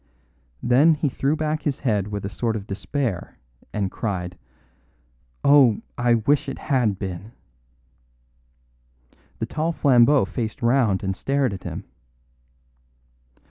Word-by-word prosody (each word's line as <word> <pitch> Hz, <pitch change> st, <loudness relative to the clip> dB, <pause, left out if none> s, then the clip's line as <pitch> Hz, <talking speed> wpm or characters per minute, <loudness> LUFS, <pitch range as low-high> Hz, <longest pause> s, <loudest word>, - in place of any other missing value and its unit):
Then 140 Hz, +7 st, +5 dB
he 150 Hz, -1 st, 0 dB
threw 140 Hz, +3 st, 0 dB
back 155 Hz, 0 st, -1 dB
his 145 Hz, -3 st, -2 dB
head 105 Hz, -6 st, 0 dB
with 105 Hz, -1 st, -5 dB
a -, -, -1 dB
sort 115 Hz, +2 st, -2 dB
of 100 Hz, -3 st, -5 dB
despair 105 Hz, 0 st, -3 dB, 0.3 s
and 100 Hz, -3 st, -2 dB
cried: 90 Hz, -5 st, -3 dB, 1.1 s
"Oh, 140 Hz, -6 st, +5 dB
I 120 Hz, -1 st, +3 dB
wish 135 Hz, +5 st, +1 dB
it 135 Hz, -, -5 dB
had 120 Hz, -8 st, 0 dB
been." 95 Hz, +4 st, -6 dB, 2.0 s
The 110 Hz, -, -2 dB
tall 160 Hz, +7 st, -1 dB
Flambeau 135 Hz, -4 st, +4 dB
faced 110 Hz, +3 st, -5 dB
round 115 Hz, -6 st, +2 dB
and 95 Hz, -1 st, -1 dB
stared 135 Hz, 0 st, 0 dB
at 95 Hz, -, -8 dB
him. -, -, -5 dB
120 Hz, 125 wpm, -23 LUFS, 100-140 Hz, 2.0 s, Then